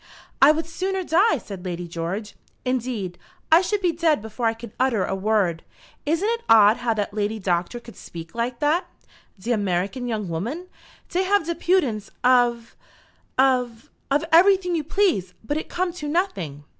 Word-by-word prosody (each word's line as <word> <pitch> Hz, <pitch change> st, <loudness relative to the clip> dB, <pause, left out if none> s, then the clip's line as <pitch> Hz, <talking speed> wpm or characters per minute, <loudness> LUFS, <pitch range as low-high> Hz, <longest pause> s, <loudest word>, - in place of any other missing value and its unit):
"I 275 Hz, +2 st, +9 dB
would 315 Hz, +1 st, -1 dB
sooner 375 Hz, +3 st, -3 dB
die," 360 Hz, +3 st, +3 dB
said 195 Hz, -6 st, -9 dB
Lady 175 Hz, -1 st, -4 dB
George. 175 Hz, +6 st, -5 dB, 0.3 s
"Indeed, 240 Hz, -8 st, -2 dB, 0.3 s
I 325 Hz, +2 st, +8 dB
should 405 Hz, +2 st, -1 dB
be 355 Hz, -2 st, +2 dB
dead 325 Hz, -2 st, +2 dB
before 220 Hz, +2 st, -3 dB
I 225 Hz, -, 0 dB
could 230 Hz, -1 st, -10 dB
utter 250 Hz, -7 st, +2 dB
a -, -, -3 dB
word. 195 Hz, -4 st, 0 dB, 0.4 s
Isn't 335 Hz, +7 st, +1 dB
it 465 Hz, +1 st, 0 dB
odd 220 Hz, 0 st, +7 dB
how 240 Hz, -2 st, -1 dB
that 205 Hz, -1 st, -2 dB
lady 210 Hz, +1 st, -1 dB
Doctor 180 Hz, +3 st, -1 dB
could 235 Hz, -1 st, -13 dB
speak 165 Hz, -1 st, -10 dB
like 235 Hz, +1 st, -2 dB
that." 310 Hz, +5 st, +1 dB, 0.5 s
"De 230 Hz, +6 st, -3 dB
American 205 Hz, +3 st, -1 dB
young 215 Hz, -4 st, -2 dB
woman! 235 Hz, -, -4 dB, 0.4 s
Dey 360 Hz, -, 0 dB
have 385 Hz, -2 st, +2 dB
de 340 Hz, -, -1 dB
impudence 300 Hz, -, 0 dB
of 245 Hz, -2 st, +3 dB, 0.6 s
of 250 Hz, -3 st, +1 dB, 0.2 s
of 290 Hz, +3 st, +1 dB
everything 365 Hz, +1 st, +5 dB
you 320 Hz, -3 st, 0 dB
please; 305 Hz, -, 0 dB
but 290 Hz, +7 st, -2 dB
it 310 Hz, -, -4 dB
come 360 Hz, -1 st, -1 dB
to 305 Hz, -4 st, -6 dB
noting." 195 Hz, -, -2 dB
245 Hz, 170 wpm, -23 LUFS, 205-330 Hz, 0.6 s, I